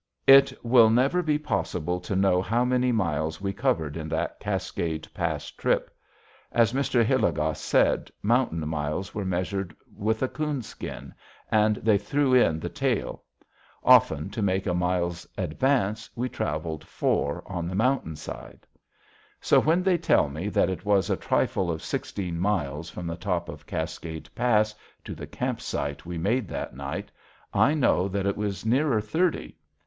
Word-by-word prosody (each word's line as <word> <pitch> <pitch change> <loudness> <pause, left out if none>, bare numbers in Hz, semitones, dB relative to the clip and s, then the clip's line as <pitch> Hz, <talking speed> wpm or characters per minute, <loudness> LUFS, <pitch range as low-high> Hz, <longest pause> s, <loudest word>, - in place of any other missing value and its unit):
It 135 0 +8
will 115 -2 +6
never 130 +10 +3
be 155 -3 +1
possible 90 - -2
to 90 +2 -4
know 95 -1 +3
how 115 +6 +1
many 125 0 +2
miles 80 -7 -1
we 100 0 -2
covered 80 -6 0
in 80 -1 -5
that 80 +1 -2
Cascade 80 -2 -3
Pass - - -2
trip. - - -1 0.6
As 115 -1 +3
Mr. 130 -3 +2
Hilligoss 80 - +1
said, - - +2
mountain 105 -8 +1
miles 75 +4 -3
were 105 -2 -3
measured 95 0 -2 0.2
with 110 +3 -1
a - - +2
coonskin, 150 -5 -5 0.4
and 110 0 +4
they 105 -1 +2
threw 140 +3 +1
in 85 -11 +4
the - - -4
tail. - - -2 0.6
Often 80 +5 +5
to 110 - -4
make 95 -1 +1
a 90 - 0
mile's 90 -1 -1
advance 110 - 0
we 125 +2 -1
traveled 80 -3 -3
four 70 - -1
on 85 -2 -4
the 95 - -4
mountain 115 - +1
side. 75 - -9 0.7
So - - +4
when 165 +4 +2
they 180 -2 +3
tell 115 - +3
me 80 +8 -4
that 100 - +2
it 90 - -5
was 100 -2 +2
a - - +3
trifle 95 -2 0
of 80 -2 -3
sixteen 90 -4 -3
miles 85 -5 -1
from 90 - -7
the 85 0 -3
top 90 -2 -2
of - - -10
Cascade 80 -1 -5
Pass 110 -3 +2 0.3
to - - -6
the - - -8
camp - - -3
site 70 +3 -4
we 90 -1 -4
made 105 +6 0
that - - -5
night, 70 +1 -5 0.4
I 145 - +4
know 110 -10 +2
that 100 0 -2
it 100 - +1
was 105 0 -3
nearer 130 +1 +2
thirty. 155 - -1
100 Hz, 165 wpm, -26 LUFS, 85-120 Hz, 0.7 s, It